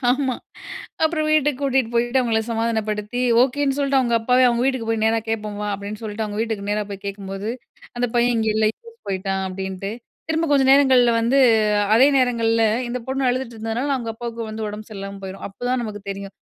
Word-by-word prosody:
ஆமா. 260 0 +1 0.7
அப்புறம் 315 -1 +1
வீட்டுக்கு 295 -3 +2
கூட்டிட்டு 265 -4 +1
போயிட்டு, 240 +2 +2
அவுங்கள 230 -3 +1
சமாதானப்படுத்தி, 225 0 -1 0.2
ஓகேன்னு 275 +1 0
சொல்ட்டு 275 -1 +2
அவுங்க 240 -3 +1
அப்பாவே 250 +3 +3
அவுங்க 240 0 +1
வீட்டுக்கு 260 -4 -1
போய் 220 -1 0
நேரா 225 +1 +3
கேட்போம் 210 -2 -3
வா! 210 - -2
அப்பிடின்னு 205 +1 -7
சொல்லிட்டு, 215 0 -3
அவுங்க 205 0 -5
வீட்டுக்கு 220 -3 -3
நேரா 210 0 0
போய் 200 0 -7
கேட்கும்போது, 195 +1 -5 0.5
அந்த 245 0 +1
பையன் 240 0 +3
இங்கே 220 -1 +1
இல்ல, 220 - +2
யூஎஸ் 465 0 -17
போயிட்டான் 190 0 -2
அப்பிடின்ட்டு, 190 +1 -5 0.4
திரும்ப 320 +1 0
கொஞ்ச 280 -2 +4
நேரங்கள்ல 260 -4 +5
வந்து 240 +4 +2 0.6
அதே 235 +4 +7
நேரங்கள்ல 230 -2 +2 0.3
இந்த 245 +1 -2
பொண்ணு 265 0 0
அழுதுட்டு 250 -1 -2
இருந்ததுனால, 225 +6 -2
அவுங்க 230 -3 -4
அப்பாவுக்கு 230 0 -5
வந்து 215 0 -4
உடம்பு 210 +1 -8
சரியில்லாம 195 -1 -7
போயிரும். 190 +1 -7
அப்பதான் 245 +5 -2
நமக்கு 205 -2 -7
தெரியும். 195 0 -7
230 Hz, 180 wpm, -22 LUFS, 210-255 Hz, 0.7 s, அதே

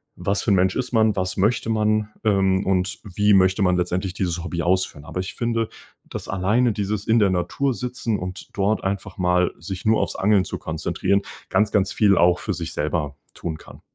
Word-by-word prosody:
„Was 100 +3 -1
für 110 - +1
'n 100 - +5
Mensch 95 0 +2
ist 125 -1 -2
man? 110 -2 +3
Was 95 0 -2
möchte 110 +3 +1
man, 110 -1 +1
ähm, 95 -2 +2
und 95 0 0
wie 105 0 +2
möchte 95 +1 +4
man 90 -1 +3
letztendlich 90 +1 -1
dieses 90 -3 -2
Hobby 85 -1 -3
ausführen?“ 90 -5 0
Aber 90 - -5
ich 95 - -4
finde, 115 -1 -1 0.4
dass - - -7
alleine 105 +6 +2
dieses 105 +1 -3
In-der-Natur-Sitzen 115 +3 0
und 90 +1 -7
dort 100 +2 0
einfach 95 0 -3
mal 90 0 +2
sich 90 +3 -6
nur 110 0 +3
aufs - - -2
Angeln 100 -1 +3
zu - - -5
konzentrieren, 85 +5 -1 0.3
ganz, 105 0 +2
ganz 100 -2 +2
viel 100 -3 +4
auch 90 +1 +4
für - - -2
sich - - -5
selber 75 -2 -2 0.2
tun 80 -2 -5
kann. - - -15
95 Hz, 190 wpm, -23 LUFS, 90-105 Hz, 0.4 s, n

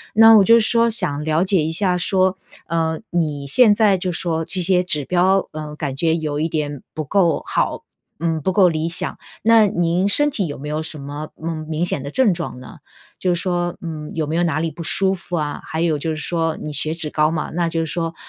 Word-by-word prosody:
那 225 0 +8
我 210 - +7
是 - - -1
就 230 - +8
说 230 +1 +3
想 150 -10 +1
了 160 +3 +1
解 185 -4 +2
一 160 - -2
下 180 +1 +1
说， 185 +1 +1 0.3
呃， 160 -1 -1
你 150 -5 -1
现 220 - +5
在 205 -3 +3
就 180 0 -3
说 165 -1 -1
这 180 +3 -1
些 180 0 +3
指 150 -6 -1
标， 185 +3 +2
呃， 150 -1 -7
感 145 -4 -4
觉 160 +2 +1
有 150 -2 -3
一 160 +2 -1
点 145 -3 -3
不 155 - -4
够 170 -1 +2
好， - - -1 0.4
嗯， 165 -1 -1
不 190 - 0
够 190 -2 +5
理 160 0 -1
想， 165 - +1 0.3
那 225 -2 +5
您 175 +2 0
身 295 +7 +3
体 205 -10 -2
有 145 - -6
没 145 +3 -8
有 155 +1 -2
什 155 -1 -7
么， 145 +2 -7
嗯， 160 -1 -4
明 160 +2 -1
显 145 - -1
的 140 - -6
症 245 -3 +3
状 170 -7 -6
呢？ 125 - -12 0.4
就 180 -2 +1
是 - - -3
说， 175 -1 -2
嗯， 155 -2 -6
有 160 -2 -1
没 155 +2 -3
有 175 - +1
哪 160 -3 0
里 165 0 -2
不 170 +3 -10
舒 190 +3 +2
服 180 -1 -6
啊？ 150 -2 -3
还 160 - -5
有 160 -3 +1
就 160 - -3
是 160 - -2
说， 165 +1 -2
你 150 - -6
血 155 +2 -1
脂 155 -3 -5
高 155 0 +2
嘛， 160 -1 -3
那 170 -1 0
就 165 0 -2
是 - - -1
说， 165 +1 -3
165 Hz, 255 characters per minute, -20 LUFS, 155-185 Hz, 0.4 s, 那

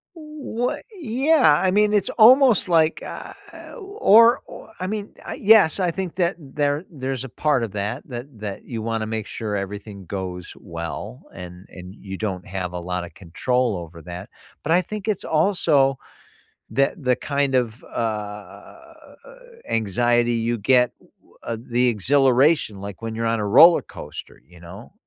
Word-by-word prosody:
What 305 -6 -4
Yeah, 265 - +3
I 185 - +3
mean, 210 +2 +3
it's 205 -2 +1
almost 245 -1 +6
like, 165 -2 +2
uh - - -8 0.5
or 240 - +4
o - - -11
I 185 - -2
mean, 210 0 -5
I - - -6
yes. 205 -6 +5
I 180 -2 +1
think 185 -1 -5
that 175 -1 +1
there 145 +1 -2
there's 135 -4 -4
a - - -7
part 140 0 0
of 110 - -4
that 105 +1 -3
that 120 0 -6
that 105 -2 -6
you 115 -3 -6
wanna 115 -1 -2
make 110 -1 -4
sure 110 -2 -5
everything 100 0 -7
goes 90 -1 -6
well, 85 +8 -7
and 90 0 -10
and 90 +1 -11
you 95 -3 -8
don't 95 -5 -4
have 95 -2 -4
a 90 - -5
lotta 90 0 -4
control 120 +6 -1
over 85 -1 -9
that. 90 +4 -9 0.3
But 160 - 0
I 180 - +4
think 210 +2 -7
it's 215 -4 -2
also 155 -5 +2 0.8
that 140 +4 0
the 125 -1 +2
kind 140 0 -1
of, 120 -2 -1
u - - -16
uh, 105 -2 -7 0.5
anxiety 120 +3 +1
you 115 +1 -1
get, 125 +3 +3
w - - -27
uh, 115 - -4 0.2
the 125 0 +4
exhilaration, 130 - +3
like 100 +1 -8
when 115 -1 -4
you're 115 0 -2
on 115 -1 0
a 105 - -2
roller 165 +11 +7
coaster, - - -10
you 90 -1 -18
know. 90 +6 -12
125 Hz, 165 wpm, -22 LUFS, 100-170 Hz, 0.8 s, roller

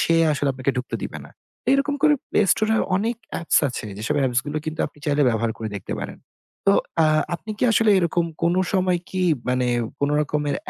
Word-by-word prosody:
সে 165 - +3 0.2
আসলে 145 -1 0
আপনাকে 130 +1 -1
ঢুকতে 125 +1 -3
দিবে - - -5
না। - - -14 0.3
তো - - -59
এরকম 280 +1 +1
করে 305 -1 +6 0.2
Play - - +3
Store 215 0 0
এ - - +2 0.2
অনেক 225 +4 -1 0.2
apps 170 - +3
আছে 120 - -5
যেসব 110 - -1
apps 125 0 +1
গুলো 150 +1 -2
কিন্তু 155 0 -3
আপনি 150 - -15
চাইলে 145 0 +2
ব্যবহার 115 0 0
করে 110 - -4
দেখতে 100 - -6
পারেন। - - -6 0.5
তো - - +7 0.3
আ - - +5 0.3
আপনি 215 +5 -7
কি - - +1
আসলে 225 -1 +4
এরকম 170 -1 +1 0.2
কোনো 170 +2 +2
সময় 185 -2 +2
কি 185 -1 -2 0.3
মানে 125 0 +1 0.3
কোনো 145 +1 +1
রকমের 150 -1 -1
155 Hz, 210 wpm, -23 LUFS, 130-190 Hz, 0.5 s, তো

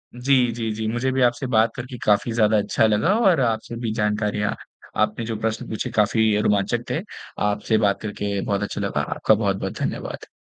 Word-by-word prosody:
जी, 125 -1 +2
जी, 115 -1 -3
जी। 110 0 -3
मुझे 125 +3 0
भी 130 - 0
आपसे 125 +2 +2
बात 115 -2 +3
करके 125 0 -7
काफ़ी 105 +3 +3
ज़्यादा 110 -1 +3
अच्छा 105 +2 +2
लगा 110 - +2
और 175 -5 +4
आपसे 115 -2 -1
भी 115 -2 -2
जानकारियाँ 105 -1 0 0.5
आपने 110 +2 0
जो 115 -1 -3
प्रश्न 110 0 -2
पूछे 110 - -3
काफ़ी 110 0 +2
रोमांचक 105 +3 +1
थे। 155 - -1 0.5
आपसे 105 +2 0
बात 100 - +1
करके 100 -1 -3
बहुत 100 0 0
अच्छा 105 - -4
लगा - - -1
आपका - - +1
बहुत-बहुत 100 -2 -2
धन्यवाद। - - -4
110 Hz, 185 wpm, -23 LUFS, 105-120 Hz, 0.5 s, और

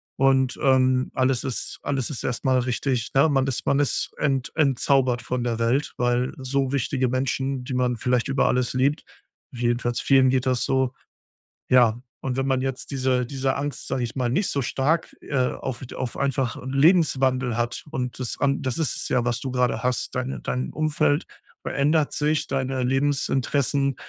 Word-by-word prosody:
und, 135 -1 +2
ähm, 130 -2 +3
alles 130 -1 +1
ist 130 -3 -4
alles 135 -1 -2
ist 135 - -5
erst 120 - -3
mal 130 -1 +4
richtig 125 0 -1
ne, 140 +4 +6
man 135 -2 +2
ist 135 - -2
man 140 - +2
ist 145 - 0
ent 135 -4 0
entzaubert 135 -4 +2
von 125 +1 -2
der 120 -2 -1
Welt, 120 +5 0
weil 125 +2 +1
so 135 0 -1
wichtige 135 -1 0
Menschen, 130 +1 -1
die 125 - -5
man 125 -1 +1
vielleicht 125 +1 0
über 135 0 +1
alles 125 -1 +1
liebt, 140 +4 +1 0.5
jedenfalls 120 0 -1
vielen 135 -1 +5
geht 130 0 +1
das 130 -2 +1
so 130 -1 +1 0.8
ja, 120 -2 +4 0.2
und 130 -2 -3
wenn 135 0 0
man 130 -1 +2
jetzt 135 +1 -4
diese 130 -2 +1
diese 135 +1 -1
Angst, 145 0 -4
sage 130 - -2
ich 120 +1 -4
mal, 125 -2 0
nicht 180 - 0
so 140 - 0
stark, 150 +7 0
äh, 145 - -5 0.2
auf 130 -3 -5
d - - -11
auf 125 - -4
einfach 135 -3 -1
'n 130 +1 -6
Lebenswandel 135 -6 +3
hat 120 0 -2
und 125 -4 -3
das 125 -3 -4
an 140 -1 +1
das 130 -4 -2
ist 155 -6 0
es - - -4
ja, 120 -2 +1
was 120 -1 0
du 130 0 -5
grade 125 -2 0
hast, 125 -1 -1
deine 130 +1 -3
dein 125 +1 -3
Umfeld 150 -1 +1 0.4
verändert 150 +2 +1
sich, 150 +1 0
deine 130 -1 -1
Lebensinteressen, 135 +1 +1
130 Hz, 185 wpm, -24 LUFS, 125-140 Hz, 0.8 s, ne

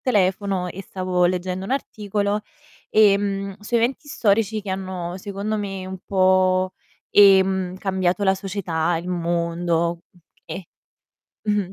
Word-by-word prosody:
telefono 195 -4 +1
e 195 +2 -7
stavo 185 -1 -1
leggendo 185 +1 -1
un - - -6
articolo, 210 -5 -1 0.5
ehm, 200 -2 +3
su 210 +4 -6
eventi 235 +5 +1
storici 220 -3 +1
che 200 -2 -6
hanno 185 -2 -4
secondo 200 +2 -3
me 195 -2 -4
un 190 0 -6
po', 185 -1 +3 0.4
ehm, 190 -2 +5
cambiato 190 -1 0
la 190 -1 +4
società, 175 -4 -1
il 175 +2 -7
mondo, 170 -1 0 0.4
okay. 185 - -7 0.7
Mh-mh. 205 -3 0
190 Hz, 125 wpm, -22 LUFS, 180-200 Hz, 0.7 s, ehm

